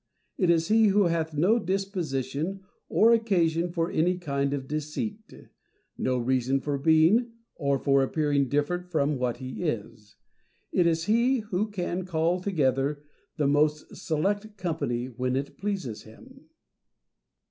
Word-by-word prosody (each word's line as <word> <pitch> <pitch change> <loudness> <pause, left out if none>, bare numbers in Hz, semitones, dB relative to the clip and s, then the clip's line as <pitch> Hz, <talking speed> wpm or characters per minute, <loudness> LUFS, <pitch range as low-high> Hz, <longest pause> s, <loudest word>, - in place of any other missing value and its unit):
It 180 -4 +1
is 165 -1 +2
he 220 0 +5
who 200 +1 +4
hath 165 -3 -1
no 190 +10 +3
disposition 180 - -2 0.3
or 230 +2 +5
occasion 175 -7 +1
for 170 0 -1
any 180 +3 +1
kind 140 -5 -1
of 135 -2 -3
deceit, 155 - -4 0.6
no 130 0 0
reason 130 +2 +1
for 140 0 -2
being 165 - +4 0.2
or 140 -3 0
for 140 0 +3
appearing 140 -1 +1
different 175 +6 -1
from 150 -4 0
what 125 -2 -1
he 130 +4 -7
is. 105 - -4 0.6
It 175 -2 +3
is 165 -1 +1
he 235 +6 +2
who 210 0 -2
can 180 -2 -3
call 170 0 0
together 145 -5 0 0.3
the 150 - +1
most 150 +2 +1
select 205 +7 -2
company 145 -10 -2
when 125 0 -2
it 135 +1 -3
pleases 190 - -3
him. 260 - -16
160 Hz, 140 wpm, -27 LUFS, 140-195 Hz, 0.6 s, he